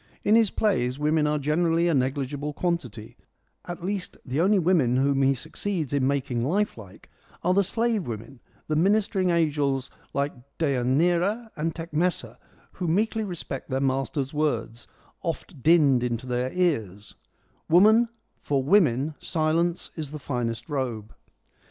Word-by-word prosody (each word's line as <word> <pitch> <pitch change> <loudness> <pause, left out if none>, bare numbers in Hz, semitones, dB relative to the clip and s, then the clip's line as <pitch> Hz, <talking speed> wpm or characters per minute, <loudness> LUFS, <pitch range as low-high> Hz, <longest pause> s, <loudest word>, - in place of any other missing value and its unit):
In 210 - +3
his 225 -2 +5
plays 125 - 0
women 150 +1 +2
are 150 0 +1
generally 165 +3 +1
a 170 - +2
negligible 140 +2 -1
quantity; 135 - -3 0.5
at 175 0 -7
least 195 0 -3
the 135 +5 -1
only 200 +4 +4
women 165 -9 +3
whom 135 +1 +2
he 135 0 +3
succeeds 155 +2 -3
in 135 -2 +2
making 130 -4 -1
lifelike 130 - -3 0.4
are 180 - +3
the 200 - +4
slave 225 - 0
women, 120 +3 -7 0.3
the 155 - 0
ministering 190 +1 +2
angels 145 -5 +1 0.2
like 140 +1 -1 0.2
Deianira 170 - +1
and 160 +2 -2
Tecmessa 165 +2 -2 0.3
who 180 - -4
meekly 220 +6 +1
respect 175 -8 -6
their 130 - 0
master's 135 +1 -1
words, 120 -6 -2 0.2
' - - -33
oft 165 -3 -5
dinned 145 -5 +5
into 120 0 -2
their 125 +1 -1
ears 110 - -1 0.2
' - - -44
— - - -39
' - - -42
Woman, 215 +7 +6 0.3
for 140 -2 0
women 150 - +3
silence 165 +1 0
is 155 -4 -5
the 150 - -6
finest 120 -5 -3
robe.' 125 -8 -3
150 Hz, 150 wpm, -26 LUFS, 130-175 Hz, 0.5 s, Woman